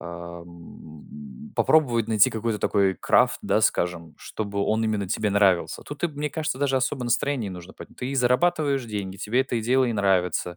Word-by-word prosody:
а, 85 0 -8
м, 80 -5 -13
попробовать 120 -8 +2
найти 110 -2 +4
какой-то 110 -1 -2
такой 100 -2 +1
крафт, - - +2
да, - - +1
скажем, 85 -2 -1
чтобы 100 -2 -5
он 110 +1 0
именно 105 -3 -1
тебе 105 +3 -1
нравился. 100 -3 +2
Тут 145 0 -9
и 175 - +3
б 155 - -11
мне 150 0 -2
кажется, 155 -4 -3
даже 140 -1 +1
особо 130 0 -1
настроение 120 -2 -1
не - - -7
нужно 90 +1 -11
поднь - - -12
Ты 125 - -6
и 140 - -4
зарабатываешь 135 +1 +1
деньги, 100 -3 -5
тебе 120 +7 +1
это 125 -2 -4
и - - -1
дело, 130 +4 +2
и 120 - -1
нравится. 90 -4 0
110 Hz, 200 wpm, -24 LUFS, 90-130 Hz, -, найти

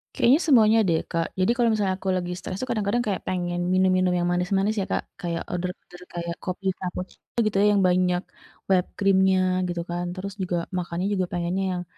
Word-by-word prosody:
Kayaknya 265 +7 +5
semuanya 225 -5 +6
deh, 165 -1 +2
Kak. 165 0 0
Jadi, 185 +5 +3
kalau 235 -2 +3
misalnya 200 -3 +1
aku 190 0 -4
lagi 180 -1 -1
stres 185 +1 -6
itu 255 - -3
kadang-kadang 215 +1 0
kayak 195 -3 -1
pengen 175 -1 -1
minum-minum 185 -1 +3
yang 175 0 0
manis-manis 195 +4 +1
ya - - 0
Kak, - - 0 0.2
kayak 170 -1 -2
order-order 180 0 -6
kayak 170 -1 -4
kopi 185 +1 -5
cappuccino 180 +4 -7
gitu 205 - -3
ya - - +5
yang 200 - +3
banyak 180 0 +2 0.5
whipped 185 -2 +2
cream-nya 190 -1 +4 0.3
gitu 175 -1 -3
kan. 175 +1 -2
Terus 195 +1 -5
juga 175 -2 -2
makannya 175 +2 -2
juga 185 -2 +1
pengennya 175 +2 -1
yang 175 - -3
185 Hz, 190 wpm, -25 LUFS, 175-195 Hz, 0.5 s, semuanya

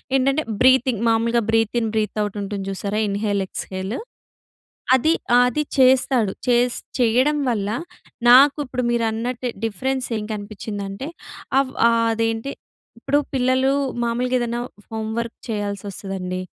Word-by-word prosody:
ఏంటంటే 275 +3 +2 0.2
బ్రీతింగ్ 255 -3 +4
మామూలుగా 230 +1 +2
breath 225 0 +1
in 225 - -1
breath 215 -1 -1
out 205 0 -4
ఉంటుంది 200 -1 -4
చూసారా? 200 +2 -2
ఇన్‌హేల్, 200 0 0
ఏక్స్‌హేలు 190 +3 -5 1.0
అది 285 +5 +2 0.2
ఆహ్, 245 - +7
అది 275 +5 -1 0.2
చేస్తాడు. 255 -4 +4 0.2
చేస్ 245 0 +3 0.2
చేయడం 255 +5 +3
వల్ల, 210 -4 -1 0.6
నాకు 275 +4 +8
ఇప్పుడు 250 -1 -3
మీరన్నట్టే 235 +2 -1 0.2
డిఫరెన్స్ 255 +5 -2
ఏం 210 - -4
కనిపించిందంటే, 205 +2 -6 0.5
అవ్ 275 -1 +1 0.2
ఆహ్, 230 0 +2
అదేంటి, 225 +3 -1 0.5
ఇప్పుడు 285 +4 +1
పిల్లలు 260 +1 +2 0.3
మామూలుగా 245 +2 0
ఏదన్నా 240 0 -2 0.3
హోమ్ 220 0 -3
వర్క్ 235 0 -5
చేయాల్సి 205 -2 -3
వస్తదండి. 185 -2 -5
230 Hz, 125 wpm, -22 LUFS, 210-255 Hz, 1.0 s, నాకు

